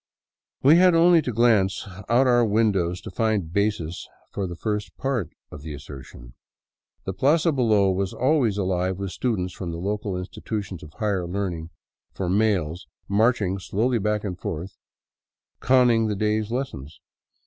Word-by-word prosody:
We 145 Hz, +5 st, +7 dB
had 180 Hz, -1 st, +5 dB
only 170 Hz, 0 st, +6 dB
to 130 Hz, -, -3 dB
glance 110 Hz, -5 st, +2 dB, 0.2 s
out 120 Hz, +3 st, +4 dB
our 120 Hz, -1 st, +4 dB
windows 100 Hz, -5 st, +1 dB
to -, -, -8 dB
find 105 Hz, -8 st, -1 dB
basis 100 Hz, -5 st, -1 dB, 0.2 s
for 100 Hz, -2 st, -3 dB
the 85 Hz, -, -6 dB
first 105 Hz, +3 st, -4 dB
part 125 Hz, -, -1 dB, 0.2 s
of 75 Hz, -, -9 dB
the 75 Hz, 0 st, -7 dB
assertion. 65 Hz, -4 st, -11 dB, 0.7 s
The 95 Hz, -, -4 dB
plaza 150 Hz, -, +3 dB
below 110 Hz, -8 st, +3 dB
was 95 Hz, 0 st, -1 dB
always 130 Hz, -6 st, +1 dB
alive 95 Hz, -1 st, -1 dB
with 100 Hz, -1 st, -4 dB
students 95 Hz, -7 st, -2 dB
from 90 Hz, -2 st, -6 dB
the 85 Hz, -, -5 dB
local 100 Hz, +1 st, -3 dB
institutions 95 Hz, 0 st, -5 dB
of 75 Hz, -, -12 dB
higher 100 Hz, -6 st, -1 dB
learning 90 Hz, -3 st, -3 dB, 0.5 s
for 95 Hz, -2 st, -2 dB
males 95 Hz, -4 st, 0 dB, 0.2 s
marching 105 Hz, -2 st, +1 dB
slowly 115 Hz, +6 st, 0 dB
back 105 Hz, 0 st, -1 dB
and 95 Hz, -4 st, -5 dB
forth 95 Hz, -2 st, -5 dB, 0.8 s
conning 120 Hz, -3 st, +4 dB
the 105 Hz, -, -1 dB
day's 105 Hz, +1 st, 0 dB
lessons. 115 Hz, -, -5 dB
100 Hz, 150 wpm, -24 LUFS, 90-115 Hz, 0.8 s, We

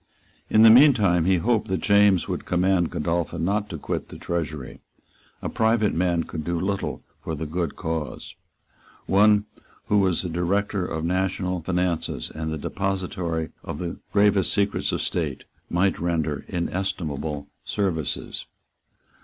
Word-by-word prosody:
In 110 Hz, -, +6 dB
the 115 Hz, -, +10 dB
meantime 110 Hz, -, +6 dB
he 95 Hz, 0 st, +4 dB
hoped 110 Hz, +4 st, +1 dB
that 95 Hz, 0 st, -1 dB
James 100 Hz, -3 st, +4 dB
would -, -, -3 dB
command 90 Hz, -1 st, +2 dB
Godolphin 85 Hz, +1 st, -1 dB
not 105 Hz, +2 st, 0 dB
to 80 Hz, -, -5 dB
quit -, -, -4 dB
the -, -, -9 dB
Treasury. 75 Hz, -7 st, -4 dB, 0.6 s
A -, -, -1 dB
private 110 Hz, -1 st, +2 dB
man 85 Hz, -1 st, +1 dB
could 80 Hz, -1 st, -6 dB
do 85 Hz, +1 st, -1 dB
little 95 Hz, +2 st, -2 dB, 0.2 s
for 80 Hz, -, -3 dB
the 80 Hz, +2 st, -4 dB
good 85 Hz, 0 st, -2 dB
cause. 80 Hz, -2 st, -4 dB, 0.7 s
One 105 Hz, +1 st, +4 dB, 0.4 s
who 105 Hz, -, +4 dB
was 95 Hz, -3 st, +2 dB
the 90 Hz, -, -3 dB
director 90 Hz, +3 st, 0 dB
of 80 Hz, -1 st, -3 dB
the -, -, 0 dB
national 95 Hz, -1 st, -1 dB
finances, 85 Hz, -8 st, -1 dB
and 80 Hz, 0 st, -4 dB
the 80 Hz, -, -3 dB
depository 90 Hz, -2 st, -2 dB
of -, -, -5 dB
the 85 Hz, 0 st, -5 dB
gravest 100 Hz, -2 st, +3 dB
secrets 100 Hz, 0 st, +1 dB
of -, -, -1 dB
state, -, -, -2 dB, 0.3 s
might 90 Hz, +2 st, +1 dB
render 80 Hz, -4 st, -1 dB
inestimable 85 Hz, -5 st, -3 dB, 0.2 s
services. 85 Hz, -8 st, -2 dB
90 Hz, 145 wpm, -24 LUFS, 80-100 Hz, 0.7 s, the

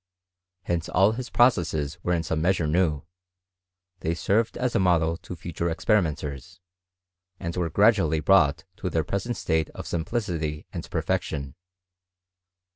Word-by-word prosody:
Hence 85 Hz, -1 st, -2 dB
all 100 Hz, +2 st, +4 dB
his 125 Hz, +2 st, -5 dB
processes 80 Hz, -, +2 dB
were 90 Hz, -, 0 dB
in 85 Hz, -, -1 dB
some 80 Hz, -1 st, -1 dB
measure 85 Hz, -1 st, +2 dB
new: 75 Hz, -2 st, +1 dB, 1.0 s
they 80 Hz, 0 st, -1 dB
served 105 Hz, +7 st, +1 dB
as 125 Hz, -1 st, -1 dB
a -, -, +2 dB
model 85 Hz, -3 st, +3 dB
to 90 Hz, -, -9 dB
future 85 Hz, +1 st, -3 dB
experimenters, 80 Hz, -, -1 dB, 0.8 s
and 85 Hz, -2 st, -4 dB
were 90 Hz, -2 st, -1 dB
gradually 95 Hz, -4 st, +3 dB
brought 75 Hz, -4 st, +4 dB
to 95 Hz, -, -3 dB
their 80 Hz, -2 st, 0 dB
present 100 Hz, +9 st, -3 dB
state 80 Hz, -2 st, 0 dB
of -, -, -7 dB
simplicity 80 Hz, -5 st, -2 dB
and -, -, -6 dB
per -, -, -2 dB
fection. 70 Hz, -3 st, -2 dB
85 Hz, 140 wpm, -26 LUFS, 80-95 Hz, 1.0 s, all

